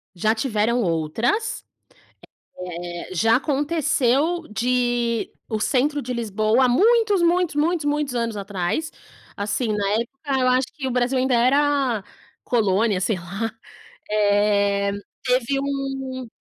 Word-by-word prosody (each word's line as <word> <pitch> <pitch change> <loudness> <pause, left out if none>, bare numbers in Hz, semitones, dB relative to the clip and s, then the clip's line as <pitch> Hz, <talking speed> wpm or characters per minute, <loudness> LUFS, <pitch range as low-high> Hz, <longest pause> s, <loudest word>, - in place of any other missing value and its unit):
Já 215 +5 +2
tiveram 230 0 0
outras, 195 - -1 1.2
eh, 175 +1 -7
já 225 +7 +4
aconteceu 295 +2 +1
de, 240 0 0 0.2
o 220 -2 -2
centro 290 +5 +1
de 250 0 -4
Lisboa 220 +2 +1
há - - +4
muitos, 420 - +3
muitos, 345 -2 +2
muitos, 320 +1 +1
muitos 290 -3 -1
anos 230 -2 -2
atrás 200 - -2 0.5
assim, 210 +3 -1
na 200 -1 0
época 265 +4 -2
eu 255 - +3
acho 255 +1 +3
que 270 -3 -5
o - - -1
Brasil 250 +1 +1
ainda 255 -1 +1
era 265 -2 +2 0.4
colônia, 210 -3 +1
sei 195 +1 0
lá, 195 +6 -4 0.6
eh, 205 -1 +2 0.3
teve 255 +1 +1
um 270 -2 -4
245 Hz, 125 wpm, -22 LUFS, 215-280 Hz, 1.2 s, já